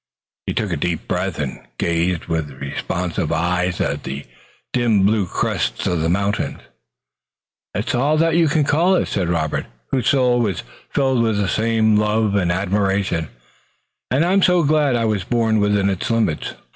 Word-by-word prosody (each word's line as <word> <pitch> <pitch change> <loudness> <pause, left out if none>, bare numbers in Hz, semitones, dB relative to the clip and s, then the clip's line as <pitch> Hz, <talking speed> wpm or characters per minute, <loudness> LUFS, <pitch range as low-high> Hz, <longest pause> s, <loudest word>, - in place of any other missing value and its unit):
He - - -2
took - - -1
a - - -1
deep 85 -2 -2
breath 90 +1 -2
and 70 -3 -4 0.2
gazed 85 +1 0
with 80 -3 -2
responsive 85 +4 -3
eyes 90 +2 0
at 70 +1 -1
the 70 +2 -6 0.5
dim 115 -5 +3
blue 105 -2 +2
crests - - -1
of 85 -3 0
the 80 - +1
mountains. 100 +3 -1 1.2
"It's 105 +4 -1
all 140 +5 +2
that 165 +1 +2
you 170 -1 +4
call 155 +4 +3
it," - - +1
said 90 -4 -1
Robert, 80 -3 -1 0.2
whose 130 - +1
soul 125 -3 +3
was 105 -7 -1 0.3
filled 130 -3 +1
with 110 -3 +1
the 100 -1 0
same 110 0 +2
love 105 0 +1
and 90 -4 +1
admiration, 95 -2 0 0.8
"and 140 +6 +2
I'm 190 +3 +3
glad 155 -7 +3
I 115 -1 +1
was 105 -4 0
born 110 0 +1
within 105 -1 +2
its 100 +5 -2
limits. 110 -9 0
105 Hz, 160 wpm, -20 LUFS, 90-120 Hz, 1.2 s, you